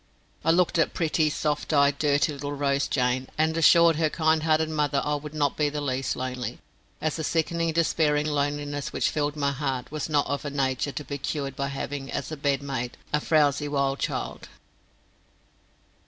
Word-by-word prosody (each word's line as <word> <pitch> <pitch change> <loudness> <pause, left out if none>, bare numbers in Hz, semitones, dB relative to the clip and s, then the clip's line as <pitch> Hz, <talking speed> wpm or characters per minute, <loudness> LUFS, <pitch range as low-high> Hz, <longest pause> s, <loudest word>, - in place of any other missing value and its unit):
I 165 - +1
looked 170 0 +3
at 165 - +1
pretty, 160 -2 +1
soft 150 0 -2
eyed, 140 -1 +3
dirty 145 +1 +2
little 145 0 -5
Rose 140 -1 0
Jane, 130 0 0
and 160 +1 +2
assured 165 0 +6
her 160 -1 +2
kind 160 0 +2
hearted 160 0 +2
mother 145 -2 +1
I 150 - 0
would 150 +1 -5
not 145 -2 +1
be 150 -1 +1
the 150 +1 -4
least 130 -2 -1
lonely, 125 -2 -4 0.4
as 155 0 -1
the 160 - -3
sickening 165 +1 0
despairing 155 -2 +2
loneliness 145 -1 -2
which - - 0
filled 145 -1 -1
my 140 -2 0
heart 135 -2 -3
was 155 0 -3
not 145 -2 +2
of 140 +2 -3
a 145 - -3
nature 135 0 -1
to 150 - -5
be 140 0 -5
cured 140 -1 -3
by 140 +1 -2
having 140 0 -5
as 140 - -4
a - - -3
bedmate 140 -4 -2 0.2
a 150 - +2
frowzy 150 -2 +2
wild 140 -1 0
child. - - -4
145 Hz, 185 wpm, -26 LUFS, 140-155 Hz, 0.4 s, assured